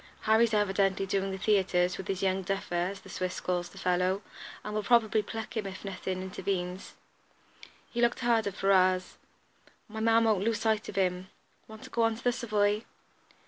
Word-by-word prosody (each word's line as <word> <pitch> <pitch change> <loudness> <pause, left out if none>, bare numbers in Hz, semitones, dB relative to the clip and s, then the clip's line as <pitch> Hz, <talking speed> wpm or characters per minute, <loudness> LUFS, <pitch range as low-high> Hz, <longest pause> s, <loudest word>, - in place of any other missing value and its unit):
Harry's 220 +1 +4
evidently 195 -2 +1
doing 195 0 -1
the 190 - -4
theatres 185 -3 +2
with 190 - -7
his 190 0 -2
'young 190 0 +1
duffer,' 195 -1 -3
as 180 +3 -1
the - - -15
Swiss 185 -1 -3
calls 175 -1 -2
the - - -16
fellow, 180 +2 +1 0.4
and 210 - -5
will 215 - 0
probably 220 -1 +3
pluck 220 +2 -6
him 215 -3 -2
if 190 +1 -8
nothing 185 -1 -4
intervenes." 185 -1 -4 1.0
He 240 - -2
looked 235 +1 +2
hard 230 -3 +2
at 200 - -4
Ferrars. 185 -1 +2 0.7
"My 220 0 -7
man 225 +1 +4
won't 215 -4 +2
lose 225 -1 0
sight 220 -1 0
of - - -8
them. 185 -1 0 0.4
Want 220 0 -11
to - - -11
go 235 - 0
on 225 -1 +3
to 235 - -12
the 245 - +3
Savoy?" 210 -3 0
195 Hz, 185 wpm, -29 LUFS, 185-220 Hz, 1.0 s, Harry's